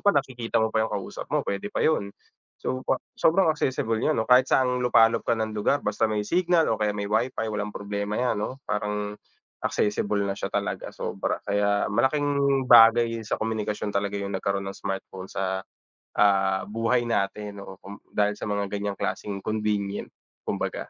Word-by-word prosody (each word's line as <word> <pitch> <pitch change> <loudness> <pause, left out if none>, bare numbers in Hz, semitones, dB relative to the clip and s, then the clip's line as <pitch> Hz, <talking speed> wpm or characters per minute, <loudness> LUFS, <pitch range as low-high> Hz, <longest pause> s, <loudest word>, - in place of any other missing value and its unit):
pa, 205 - +3
nakikita 125 -5 -1
mo 110 0 +2
pa 110 - +2
yung 110 - -1
kausap 95 -2 -7
mo, - - 0
pwede 100 0 -3
pa - - -1
yun. 130 -11 +2 0.5
So, 130 - -3
pa - - +3 0.2
sobrang 165 -1 +3
accessible 125 -6 -1
yun, 155 - +1
ano? 110 - +1
Kahit 125 +3 +5
saang 125 -1 +2
lupalop 115 -2 +4
ka 120 - +3
ng 110 -1 -2
lugar 110 +7 0
basta 105 +1 +1
may 105 -1 -1
signal 175 - +2
o 110 - -3
kaya 105 -1 0
may 100 - -2
Wi-Fi, 110 +3 0
walang 105 0 -2
problema 100 +1 -3
yan, 125 -4 0
'no? 130 +5 -4
Parang 105 0 -2 0.5
accessible 105 0 0
na 100 -1 -2
siya - - -4
talaga - - -2
sobra. - - -3
Kaya 100 0 +1
malaking 140 +3 +2
bagay 115 0 +7
sa - - -1
komunikasyon 110 -2 -2
talaga 100 0 -1
yung 100 -1 -3
nagkaroon 100 +1 -1
ng 100 - -7
smartphone 95 -1 -5
sa, 95 0 -2 0.5
ah, 95 -2 +3
buhay 115 +3 0
natin, 105 -2 -2
oo. 95 -1 -10
Kum 100 +1 -11
dahil 105 0 +1
sa 105 - -6
mga 100 0 0
ganyang 100 0 -3
klaseng 100 -2 -3
convenient 105 -2 -1 0.3
kumbaga, - - -3
105 Hz, 180 wpm, -26 LUFS, 100-120 Hz, 0.5 s, bagay